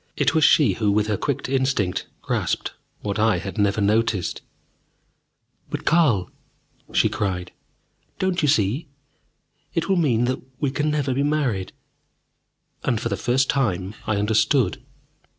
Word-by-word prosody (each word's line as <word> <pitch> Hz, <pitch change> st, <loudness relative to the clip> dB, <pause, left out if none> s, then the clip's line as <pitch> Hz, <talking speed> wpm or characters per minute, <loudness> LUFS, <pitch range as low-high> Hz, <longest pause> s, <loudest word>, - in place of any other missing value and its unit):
It -, -, +2 dB
was 160 Hz, -1 st, +3 dB
she 140 Hz, -11 st, +5 dB
who, 105 Hz, +1 st, +1 dB
with 105 Hz, +1 st, +2 dB
her 105 Hz, -1 st, 0 dB
quick 140 Hz, +6 st, -2 dB
instinct, 130 Hz, -8 st, 0 dB, 0.2 s
grasped -, -, -1 dB, 0.3 s
what 105 Hz, 0 st, -3 dB
I 110 Hz, 0 st, +3 dB
had -, -, -5 dB
never 100 Hz, +1 st, +2 dB
noticed. 105 Hz, -2 st, +1 dB, 1.3 s
"But -, -, -5 dB
Carl!" 140 Hz, -, +3 dB, 0.6 s
she -, -, +3 dB
cried, 90 Hz, -3 st, -3 dB, 0.7 s
"Don't 185 Hz, -1 st, 0 dB
you 150 Hz, -, +2 dB
see? 125 Hz, -, +1 dB, 0.9 s
It 165 Hz, -, 0 dB
will 190 Hz, -, +3 dB
mean 125 Hz, -8 st, +2 dB
that 130 Hz, +1 st, -1 dB, 0.2 s
we 140 Hz, -3 st, 0 dB
can 150 Hz, +2 st, 0 dB
never 145 Hz, -3 st, 0 dB
be 135 Hz, -, 0 dB
married!" 140 Hz, -11 st, 0 dB, 1.1 s
And, 120 Hz, -5 st, 0 dB
for -, -, -2 dB
the -, -, 0 dB
first 130 Hz, +2 st, +1 dB
time, 100 Hz, -8 st, 0 dB
I 110 Hz, -, +1 dB
understood. 110 Hz, +5 st, +2 dB
115 Hz, 145 wpm, -23 LUFS, 105-140 Hz, 1.3 s, she